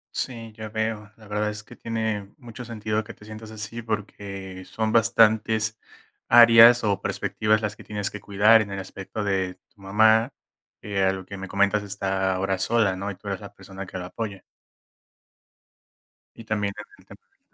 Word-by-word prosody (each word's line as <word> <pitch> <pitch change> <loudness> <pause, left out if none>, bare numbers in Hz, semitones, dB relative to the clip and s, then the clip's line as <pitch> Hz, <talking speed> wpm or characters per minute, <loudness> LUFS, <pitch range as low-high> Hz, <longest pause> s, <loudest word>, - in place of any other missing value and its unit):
Sí, 115 -3 -4
ya 110 -1 -7
veo, 110 -1 -3
la 110 -2 -16
verdad 105 +1 -1
es 105 0 -7
que 120 0 -14
tiene 110 -3 -3
mucho 120 -2 -10
sentido, 110 -1 -2
que - - -11
te 105 - -16
sientas 110 0 -9
así, 110 +2 -6
porque, 100 -3 -5
son 110 +2 -2
bastantes 110 -1 +3 0.5
áreas, 115 0 +8
o 100 -1 0
perspectivas 110 0 0
las 105 0 -2
que - - -13
tienes 105 -2 -4
que 105 - -8
cuidar, 105 +3 +5
en 100 - -4
el 100 - -5
aspecto 95 +2 -6
de 95 -2 -1 0.2
tu 100 - -23
mamá. 110 +5 +4 0.5
Eh, 100 -1 -2
a 95 0 +3
lo 95 -1 -7
que 100 - -8
me 95 0 -6
comentas 100 +2 +2
está 95 -1 -1
ahora 95 0 -1
sola, 110 -2 +2
¿no? 100 +2 -4
Y 100 - -5
tú 100 +2 -14
eres 100 -2 -2
la 100 - -11
persona 95 0 -9
que 95 - -7
la 90 0 -5
apoya. 105 -2 -6 1.9
Y 115 - -11
también 105 -2 -1
en 105 - -6 0.2
el - - -21
tema - - -14
del - - -41
105 Hz, 190 wpm, -25 LUFS, 100-110 Hz, 1.9 s, áreas